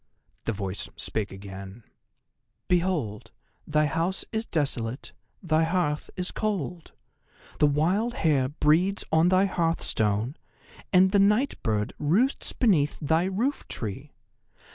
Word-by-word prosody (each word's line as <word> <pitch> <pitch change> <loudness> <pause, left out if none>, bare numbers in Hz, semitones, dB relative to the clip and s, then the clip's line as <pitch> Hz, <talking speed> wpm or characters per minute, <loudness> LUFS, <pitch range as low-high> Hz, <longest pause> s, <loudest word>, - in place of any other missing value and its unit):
The - - 0
voice 100 -2 -2
spake 105 -2 -3
again: 95 +2 -9 0.8
"Behold, 170 - 0 0.4
thy 150 0 +2
house 165 +5 -1
is 220 +1 -2
desolate; 135 -5 -2 0.3
thy 160 -2 +2
hearth 160 -3 0
is 180 0 -3
cold. 180 -6 -3 0.7
The 150 - +5
wild 185 +12 +1
hare 140 -5 +2
breeds 160 +7 +2
on 160 +2 +4
thy 185 +1 +4
hearthstone, 135 - 0 0.5
and 185 0 +5
the 200 - +4
night 210 +8 +2
bird 105 -2 -1
roosts 195 - +1
beneath 165 - +2
thy 160 +3 +2
roof 225 +10 -1
tree. 105 -4 -6
160 Hz, 120 wpm, -27 LUFS, 125-185 Hz, 0.8 s, The